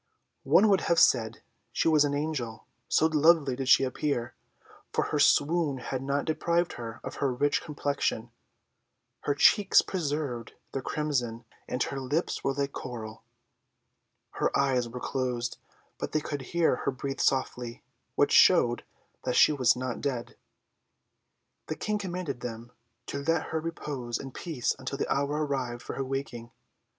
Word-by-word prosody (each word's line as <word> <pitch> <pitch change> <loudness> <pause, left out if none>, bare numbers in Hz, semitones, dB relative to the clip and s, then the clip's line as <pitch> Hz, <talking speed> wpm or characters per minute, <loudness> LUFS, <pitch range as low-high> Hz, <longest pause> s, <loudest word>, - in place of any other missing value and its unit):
One 220 - +6
would 195 -3 +4
have 170 - +3
said 115 -3 +3 0.3
she - - 0
was 155 -2 +5
an 145 -1 0
angel, 145 -7 -3 0.2
so - - +4
lovely 155 -3 +4
did 135 0 -3
she - - +7
appear 130 -2 -2 0.6
for - - +1
her - - -1
swoon 150 -2 +3
had 130 +1 -4
not 140 +1 -1
deprived 170 +2 0
her 115 0 -7
of - - -6
her 140 - +1
rich 145 +4 +1
complexion: 145 -2 -2 0.9
her 145 - +1
cheeks 200 +6 +5
preserved 145 - -3 0.2
their 135 - -3
crimson, 125 -7 -2 0.2
and 125 0 0
her 135 - -4
lips 145 +6 -2
were 135 - +1
like 140 0 -1
coral. 115 -5 -7 1.1
Her - - 0
eyes 130 -3 +1
were 125 +2 -7
closed, 125 -2 -2 0.4
but - - -4
they 155 - +3
could 145 -2 -4
hear 165 0 +1
her - - -1
breathe 135 +1 -5
softly, 125 -3 -1 0.3
which - - +3
showed - - +5 0.4
that 125 -1 -1
she - - +7
was 130 -5 +3
not 125 -1 -4
dead. 125 -5 -3 1.3
The 155 - -3
King 210 +5 -2
commanded 180 -9 -4
them 120 0 -7 0.3
to 140 - -4
let 165 +3 0
her 160 - -1
repose 140 -7 -4
in 135 - -8
peace 145 -4 -2
until 135 +1 -4
the - - 0
hour 145 +2 0
arrived 125 -4 -3
for - - -6
her 135 - -2
waking. 130 -3 -5
140 Hz, 155 wpm, -28 LUFS, 125-150 Hz, 1.3 s, she